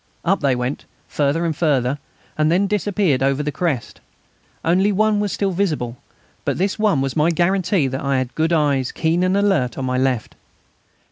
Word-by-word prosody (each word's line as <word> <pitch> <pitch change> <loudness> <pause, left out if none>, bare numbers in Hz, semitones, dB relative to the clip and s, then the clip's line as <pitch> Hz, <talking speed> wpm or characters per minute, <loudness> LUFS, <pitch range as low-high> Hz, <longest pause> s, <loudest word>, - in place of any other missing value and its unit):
Up 195 +3 +2
they 140 -3 +2
went, 125 +3 -3 0.2
further 150 +4 0
and 160 -2 -1
further, 140 -4 +1 0.4
and 155 +1 +2
then 185 +4 +3
disappeared 200 -7 0
over 135 +2 +1
the 150 - -2
crest. 150 - -3 0.6
Only 185 +5 +3
one 210 +1 +2
was 205 -1 -1
still 195 -1 -1
visible, 155 -11 -1 0.5
but - - -1
this 195 +3 -1
one 205 -10 +2
was 135 -1 -2
my 155 +2 +3
guarantee 180 0 +1
that 130 +1 -3
I 140 -1 0
had 130 -1 -2
good 160 +1 0
eyes, 145 -5 +1
keen 165 +2 0
and 185 +2 +2
alert, 190 - +1
on 135 - -3
my 130 0 0
left. 130 -4 -1
160 Hz, 185 wpm, -20 LUFS, 135-190 Hz, 0.6 s, then